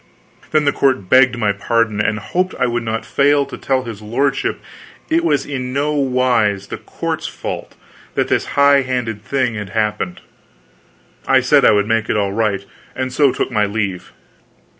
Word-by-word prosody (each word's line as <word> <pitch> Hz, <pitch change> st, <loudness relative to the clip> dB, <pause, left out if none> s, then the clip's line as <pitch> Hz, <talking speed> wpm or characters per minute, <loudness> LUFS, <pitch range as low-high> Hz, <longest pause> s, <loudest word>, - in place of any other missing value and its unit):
Then 155 Hz, -1 st, +2 dB
the 145 Hz, -, +4 dB
court 130 Hz, -10 st, 0 dB
begged 125 Hz, -1 st, +5 dB
my 105 Hz, -3 st, +1 dB
pardon, 110 Hz, +1 st, 0 dB
and 110 Hz, 0 st, 0 dB
hoped 180 Hz, -, -2 dB
I -, -, +1 dB
would 120 Hz, 0 st, -1 dB
not 115 Hz, -1 st, -3 dB
fail 145 Hz, 0 st, +2 dB
to 140 Hz, -, -8 dB
tell 130 Hz, -1 st, -1 dB
his 115 Hz, -4 st, -8 dB
lordship 125 Hz, +6 st, -1 dB, 0.5 s
it 165 Hz, +1 st, +3 dB
was 145 Hz, -5 st, +1 dB
in 130 Hz, -3 st, -4 dB
no 145 Hz, +2 st, 0 dB
wise 125 Hz, -8 st, +1 dB
the -, -, -5 dB
court's -, -, -4 dB
fault -, -, -6 dB, 0.4 s
that -, -, +1 dB
this -, -, +1 dB
high 140 Hz, 0 st, +6 dB
handed 125 Hz, -5 st, -3 dB
thing 130 Hz, -2 st, 0 dB
had 105 Hz, -3 st, -6 dB
happened. 105 Hz, -3 st, -2 dB, 1.1 s
I -, -, +5 dB
said -, -, +3 dB
I -, -, +7 dB
would 105 Hz, -1 st, +2 dB
make 115 Hz, -1 st, 0 dB
it -, -, +1 dB
all 100 Hz, -1 st, 0 dB
right, 105 Hz, -3 st, -1 dB, 0.3 s
and 130 Hz, -1 st, -3 dB
so 140 Hz, -1 st, +4 dB
took -, -, -2 dB
my 105 Hz, -1 st, +1 dB
leave. 100 Hz, -3 st, -3 dB
120 Hz, 180 wpm, -18 LUFS, 105-135 Hz, 1.1 s, I